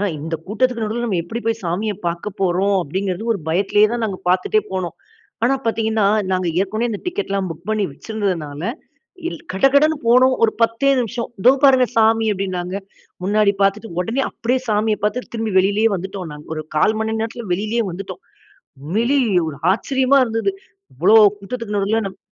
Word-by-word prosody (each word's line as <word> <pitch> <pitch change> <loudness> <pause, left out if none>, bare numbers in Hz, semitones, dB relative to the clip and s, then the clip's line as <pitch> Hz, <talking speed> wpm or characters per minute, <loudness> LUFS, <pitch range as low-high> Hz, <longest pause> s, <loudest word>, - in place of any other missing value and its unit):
ஆ - - +1 0.2
இந்த 165 +2 -4
கூட்டத்திற்கு 230 +3 0
நடுவில 225 +3 -2
நம்ம 185 -6 0
எப்படி 225 +7 -5
போய் 225 0 0
சாமிய 190 +6 -1
பார்க்க 170 +4 -2
போறோம், 190 +2 +2
அப்டிங்கிறது 190 +6 -3
ஒரு - - -4
பயத்திலேயே 200 +5 +3
தான் 240 -1 -2
நாங்க 195 -4 -3
பார்த்துட்டே 185 +4 +2
போனோம். 185 -3 -3 0.5
ஆனா 260 +3 +3
பார்த்தீங்கனா, 220 -1 +1 0.3
நாங்க 185 -1 0
ஏற்கனவே 215 +5 -1
இந்த 210 - -4
டிக்கெட் 350 - -3
எல்லாம் 195 -2 -1
புக் 165 +5 -9
பண்ணி 215 -2 +1
வச்சுருந்ததனால 170 -5 -4 0.7
இல் - - -6
கடகடனு 280 +9 +4
போனோம். 255 +2 +5
ஒரு 220 - +4
10தே 230 +4 +2
நிமிஷம். 235 0 -3 0.2
தோ 250 - +9
பாருங்க 260 -2 +6
சாமி 225 0 +4
அப்படின்னாங்க. 185 -2 -3 0.5
முன்னாடி 205 +1 +3
பார்த்துட்டு 205 +3 0
உடனே 230 +9 -1
அப்படியே 250 +3 -1
சாமிய 215 +1 +2
பார்த்து 215 +4 -2
திரும்பி 225 -2 -2
வெளியிலேயே 205 +4 +2
வந்துட்டோம் 190 -1 -6
நாங்க. 150 0 -11
ஒரு 155 - -3
1/4 210 +8 +3
மணி 220 0 -1
நேரத்தில 225 +1 -4
வெளியிலேயே 215 +5 -1
வந்துட்டோம். 195 - -7 0.6
உண்மையிலேயே 225 - +1
ஒரு 140 - -9
ஆச்சரியமா 265 +6 +2
இருந்தது. 225 - -1 0.4
இவ்வளவு 200 - +6 0.2
கூட்டத்திற்கு 215 +1 -5
நடுவில 205 +3 +1
நம் 190 - -11
215 Hz, 165 wpm, -20 LUFS, 190-230 Hz, 0.7 s, தோ